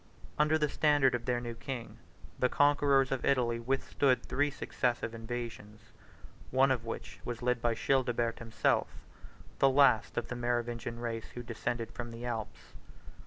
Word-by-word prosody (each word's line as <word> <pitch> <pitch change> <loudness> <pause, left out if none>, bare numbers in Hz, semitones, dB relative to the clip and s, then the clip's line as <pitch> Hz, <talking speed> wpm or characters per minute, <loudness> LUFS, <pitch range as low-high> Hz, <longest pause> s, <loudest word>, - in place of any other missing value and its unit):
Under 150 +1 +4
the 150 -1 +1
standard 145 -2 +3
of 120 -1 -2
their 125 -1 +1
new 120 -1 -5
king, 120 +1 -7 0.4
the 125 - +3
conquerors 140 -1 +3
of 135 - -1
Italy 120 -3 +2
withstood 130 +1 +1
three 145 +1 +1
successive 120 -4 -2
invasions, 115 -2 -6 0.7
one 135 +1 +4
of 125 -3 0
which 115 - -6
was 120 0 -5
led 125 -1 +1
by 120 -1 +1
Childebert 120 -3 +1
himself, 115 -1 +1 0.7
the 135 - +6
last 130 -5 +4
of 120 - -1
the 125 - -3
Merovingian 120 -1 -2
race 115 -1 -4
who 120 - -5
descended 115 0 -3
from 120 +2 -6
the 115 +1 -8
Alps. 115 -3 -5
120 Hz, 155 wpm, -31 LUFS, 115-135 Hz, 0.7 s, the